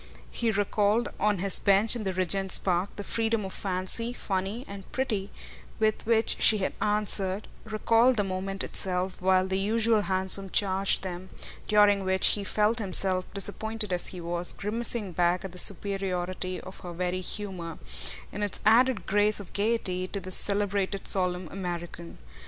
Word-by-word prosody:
He 235 - -1
recalled, 205 +2 +1
on 210 0 +1
his 195 +2 +4
bench 200 +3 +3
in 225 -3 -5
the 190 - -1
Regent's 185 +1 +2
Park, 185 +1 -1
the 205 - -6
freedom 225 0 -1
of 190 - -6
fancy, 195 +5 -2
funny 200 +2 -4
and 200 -1 -10
pretty, 215 -7 -2 0.5
with 215 0 -1
which 225 -1 +2
she 215 - +7
had 190 - -2
answered; 205 -1 -1 0.2
recalled 230 +3 +2
the 205 - +2
moment 195 0 -4
itself, 185 0 -1
while 185 0 +3
the 190 0 -1
usual 220 +2 +2
hansom 190 0 -2
charged 195 0 +2
them, 185 0 -6 0.4
during 205 -2 +4
which 190 0 +3
he 205 - -1
felt 215 +3 +1
himself, 185 -2 +2
disappointed 210 +1 -3
as 175 - -2
he 180 - -6
was, 175 +1 -3
grimacing 220 -1 -3
back 175 +2 0
at 190 - -7
the 180 - -2
superiority 185 -2 +2
of 185 - -11
her 175 -1 -8
very 180 +1 -3
"humour," 180 -4 -5 0.5
in 210 - -6
its 205 -2 -1
added 230 -2 +4
grace 205 +1 +2
of 200 - -11
gaiety, 200 -4 +1
to 200 - -5
the 185 0 -8
celebrated 200 0 +2
solemn 180 -2 0
American. 175 -2 -7
195 Hz, 160 wpm, -27 LUFS, 185-210 Hz, 0.5 s, she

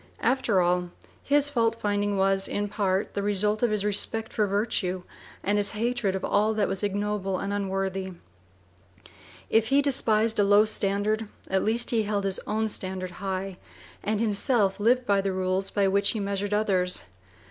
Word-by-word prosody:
After 235 -5 +2
all, 180 0 +1 0.3
his 290 0 +2
fault 230 -4 +1
finding 205 -1 -1
was 195 0 +2
in 205 0 -2
part 195 -2 -1
the 200 - -2
result 210 +1 +1
of 240 - +3
his 210 -1 -1
respect 220 +2 +1
for 210 -2 +1
virtue 195 -3 -1 0.4
and 205 +2 +1
his 205 -1 -1
hatred 230 -4 -1
of 190 - -3
all 215 +2 +1
that 210 -2 +1
was 195 -1 -3
ignoble 205 -1 -2
and 200 +1 -3
unworthy. 195 -1 -2 1.4
If 225 0 +3
he 275 +3 +3
despised 230 -6 +2
a - - +5
low 205 +2 +5
standard, 210 +1 0 0.2
at 190 0 +1
least 230 +3 +2
he 230 -2 +2
held 205 -1 -2
his 195 -1 +1
own 220 +1 0
standard 185 -3 -4
high, 190 -1 -4 0.4
and 215 0 -1
himself 210 -2 +1
lived 245 +4 +2
by 200 -3 +2
the 195 -1 -2
rules 185 +1 -1
by 200 -1 +1
which 200 +1 +3
he 220 - -3
measured 200 0 -2
others. 190 - +1
205 Hz, 170 wpm, -26 LUFS, 195-215 Hz, 1.4 s, a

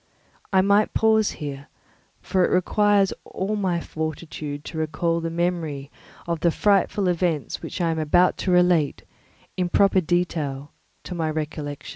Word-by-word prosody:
I 190 -1 +5
must 200 +2 +2
pause 220 -1 +3
here, 140 -2 -6 0.6
for 185 -1 +1
it - - +2
requires 200 +2 +3
all 195 +3 -3
my 185 -4 0
fortitude 155 -2 -5
to 160 - -5
recall 165 +2 0
the 165 0 -3
memory 165 -5 -2 0.3
of 170 -1 -2
the 170 - +3
frightful 200 +1 +2
events 170 -4 -1
which - - -6
I 170 -2 +1
am 160 - -2
about 175 +4 +3
to 185 - -1
relate, 180 -4 +3 0.5
in 180 -1 0
proper 195 0 +4
detail, 155 -5 -2 0.3
to - - -6
my 165 -2 -1
recollection. 150 -2 -5
170 Hz, 150 wpm, -24 LUFS, 155-185 Hz, 0.6 s, I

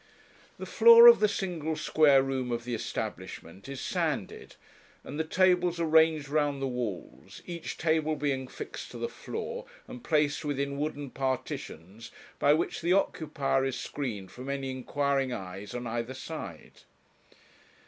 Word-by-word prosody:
The - - -6
floor 465 0 +8
of 475 0 +10
the 210 - +4
single 170 -6 -3
square 145 -4 +4
room 130 -2 -2
of 120 0 -2
the 120 0 -4
establishment 100 -2 -6
is 140 -1 -6
sanded, - - -3 0.5
and 145 - -7
the - - +2
tables 180 0 +2
are 170 - +1
ranged 160 -2 +4
round 145 -1 0
the 135 - -2
walls, 120 -8 -6
each 170 -2 -6
table 155 -1 +1
being 135 -3 -2
fixed - - -8
to - - -9
the - - -2
floor, 485 +1 -6 0.2
and 250 -1 -10
placed 150 -5 +1
within 140 -1 -2
wooden 145 -2 -4
partitions, 115 -6 -4 0.3
by 145 - +4
which 160 +3 0
the 170 +2 +2
occupier 150 -7 0
is 135 -1 -2
screened 105 -10 -5
from 130 +2 -8
any 135 -1 -3
inquiring 135 +1 -1
eyes 100 +1 -7
on 120 0 -4
either 120 +2 -3
side. - - -8
140 Hz, 150 wpm, -29 LUFS, 130-160 Hz, 0.5 s, of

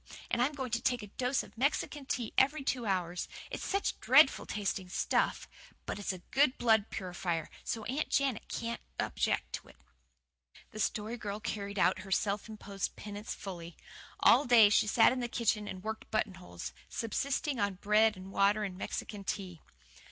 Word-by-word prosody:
And 240 - +2
I'm 275 +4 +2
going 260 -4 -4
to 230 +1 0
take 245 -4 +1
a 210 - -9
dose 255 +2 +1
of - - -15
Mexican 275 +2 -1
Tea 240 -3 -2
every 275 +2 +3
two 250 -4 -1
hours. 180 -2 -1 0.2
It's - - -4
such 395 0 -1
dreadful - - +5
tasting 195 -2 -2
stuff - - 0 0.4
but - - -4
it's 205 - -1
a 185 -2 -8
good 270 0 +4
blood 220 -3 +3
purifier, 175 -3 -3
so 225 - -3
Aunt 270 +7 -2
Janet 270 -5 +1
can't 235 0 -4 0.2
object - - 0
to - - -5
it." - - -16 1.0
The 215 - -8
Story 220 +2 -1
Girl 205 -2 -4
carried 205 -1 -4
out 185 - +3
her 195 - -9
self 200 +3 0
imposed 205 -2 -4
penance 205 +1 -6
fully. 170 -3 -8 0.4
All 290 - +6
day 230 -4 +8
she 215 - +4
sat 225 +3 +6
in 260 - -3
the 240 - -1
kitchen 220 -3 0
and 185 -2 -7
worked 220 0 -5
buttonholes, 185 - -3 0.2
subsisting 265 +3 -1
on 200 -2 +1
bread 210 +2 +3
and 185 +1 -9
water 200 +2 +3
and 190 -3 -3
Mexican 200 +1 -5
Tea. 185 -3 -4
215 Hz, 175 wpm, -32 LUFS, 195-240 Hz, 1.0 s, day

